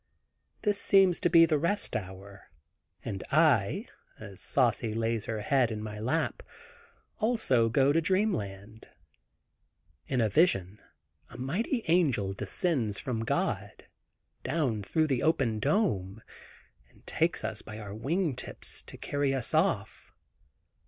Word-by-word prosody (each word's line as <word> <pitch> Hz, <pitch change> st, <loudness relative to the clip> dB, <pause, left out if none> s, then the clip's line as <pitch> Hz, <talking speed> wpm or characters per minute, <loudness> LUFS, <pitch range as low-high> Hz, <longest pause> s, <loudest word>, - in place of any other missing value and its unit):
This 205 Hz, -2 st, +1 dB
seems 190 Hz, -3 st, +4 dB
to -, -, +1 dB
be 165 Hz, -1 st, +7 dB
the 155 Hz, -2 st, +1 dB
rest 205 Hz, +7 st, 0 dB
hour, 95 Hz, 0 st, -7 dB, 0.6 s
and 95 Hz, -, -4 dB
I, 140 Hz, -10 st, +3 dB, 0.3 s
as 100 Hz, -2 st, -9 dB
Saucy 120 Hz, -3 st, +1 dB
lays 115 Hz, -1 st, -1 dB
her 110 Hz, -1 st, -3 dB
head 130 Hz, +1 st, +2 dB
in 110 Hz, -2 st, -4 dB
my 105 Hz, -1 st, -6 dB
lap, 130 Hz, +9 st, -1 dB, 0.8 s
also 215 Hz, -, +2 dB
to -, -, -3 dB
go 135 Hz, +3 st, +3 dB
to 165 Hz, -, +3 dB
dreamland. 110 Hz, -, -2 dB, 1.2 s
In 125 Hz, -4 st, +1 dB
vision 105 Hz, -, +2 dB, 0.5 s
a -, -, -11 dB
mighty 205 Hz, -, -2 dB
angel 140 Hz, -, +2 dB
descends 105 Hz, -, -1 dB
from 125 Hz, -4 st, -3 dB
God, -, -, -2 dB, 0.6 s
down 130 Hz, -7 st, -1 dB
through 155 Hz, +10 st, +1 dB
the 135 Hz, -5 st, 0 dB
open 125 Hz, -9 st, +1 dB
dome 105 Hz, -, 0 dB, 0.7 s
and -, -, -25 dB
takes -, -, 0 dB
us -, -, -4 dB
by 110 Hz, -, -9 dB
our 100 Hz, -2 st, -7 dB
wing 150 Hz, -, -1 dB
tips, -, -, -7 dB
to -, -, -11 dB
carry 145 Hz, -1 st, -1 dB
us 130 Hz, -4 st, -1 dB
off. -, -, 0 dB
125 Hz, 130 wpm, -29 LUFS, 105-165 Hz, 1.2 s, be